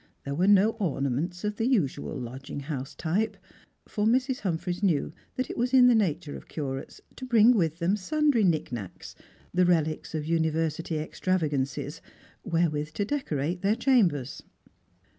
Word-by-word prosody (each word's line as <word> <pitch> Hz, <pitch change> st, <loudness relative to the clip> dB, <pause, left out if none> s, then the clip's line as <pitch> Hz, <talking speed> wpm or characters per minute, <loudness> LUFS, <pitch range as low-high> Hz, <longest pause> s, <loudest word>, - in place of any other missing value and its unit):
There 140 Hz, -, -3 dB
were 180 Hz, +6 st, +1 dB
no 205 Hz, +2 st, +6 dB
ornaments 155 Hz, -, -1 dB
of 210 Hz, 0 st, -2 dB
the 225 Hz, -, 0 dB
usual 165 Hz, -, 0 dB
lodging 130 Hz, +3 st, -6 dB
house 135 Hz, -2 st, -5 dB
type, 205 Hz, +6 st, -1 dB, 0.5 s
for 210 Hz, 0 st, 0 dB
Mrs, 255 Hz, +3 st, +2 dB
Humphreys 175 Hz, -2 st, -2 dB
knew 170 Hz, -9 st, +1 dB, 0.2 s
that.it 255 Hz, -, -3 dB
is 250 Hz, +2 st, +1 dB
in 255 Hz, -1 st, +8 dB
the 250 Hz, -, +6 dB
nature 165 Hz, -8 st, 0 dB
of -, -, -10 dB
curates 135 Hz, -3 st, -5 dB, 0.2 s
to -, -, -9 dB
bring 235 Hz, -2 st, +5 dB
with 165 Hz, -6 st, +1 dB
them 180 Hz, +3 st, +1 dB
sundry 290 Hz, +3 st, +2 dB
nicknacks, 130 Hz, -, -2 dB, 0.4 s
the 180 Hz, +1 st, +4 dB
relics 160 Hz, -3 st, +1 dB
of 150 Hz, -1 st, -2 dB
university 160 Hz, 0 st, 0 dB
extravagances, 150 Hz, -3 st, -2 dB, 0.4 s
wherewith 155 Hz, -4 st, 0 dB
to 205 Hz, -, -1 dB
decorate 175 Hz, -, -2 dB
their 200 Hz, +2 st, +2 dB
chambers. 185 Hz, -, +2 dB
170 Hz, 145 wpm, -27 LUFS, 150-210 Hz, 0.5 s, in